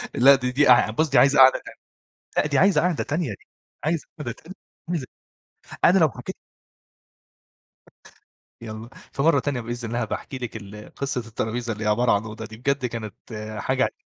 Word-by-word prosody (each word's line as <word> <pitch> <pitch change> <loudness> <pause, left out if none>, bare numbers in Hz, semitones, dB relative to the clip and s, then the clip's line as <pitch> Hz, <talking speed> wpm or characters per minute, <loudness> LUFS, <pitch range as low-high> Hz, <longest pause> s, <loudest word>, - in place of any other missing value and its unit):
لا 135 +3 +7
دي 125 -1 -2
دي 140 +2 +3
أع 125 -3 +6
بصِ 155 +8 0
دي 135 - +2
عايزة 135 +3 +5
قعدة 130 0 +8
تانية. - - -12 0.6
لأ، - - +3
دي 145 -2 +1
عايزة 195 +4 +5
قعدة 180 -2 0
تانية، 150 -2 -2
دي 105 - -6 0.5
عايزة 160 +1 -1
قعدة 125 -6 -4
تانية، 165 +9 -13 0.4
عايزة 145 -7 -3 0.8
أنا 185 - +6
لو 160 -4 +4
حكيت - - -8 2.3
يالًا، 110 0 -8 0.2
في 135 - -2
مرة 155 -2 +4
تانية 135 -2 -2
بإذن 120 0 -5
الله 120 +1 -1
هابقي 110 - -2
احكي 130 - -8
لِك 120 -3 -6
ال 105 0 -11
قصة 135 -2 -2
الترابيزة 115 +2 -3
اللي 110 0 -5
هي - - +1
عبارة 120 +4 +3
عن 100 - +2
أوضة 110 0 -7
دي، 110 0 -11
بجد 140 +2 0
كانت 115 -3 -6 0.5
حاجة 130 0 0
125 Hz, 185 wpm, -24 LUFS, 115-140 Hz, 2.3 s, قعدة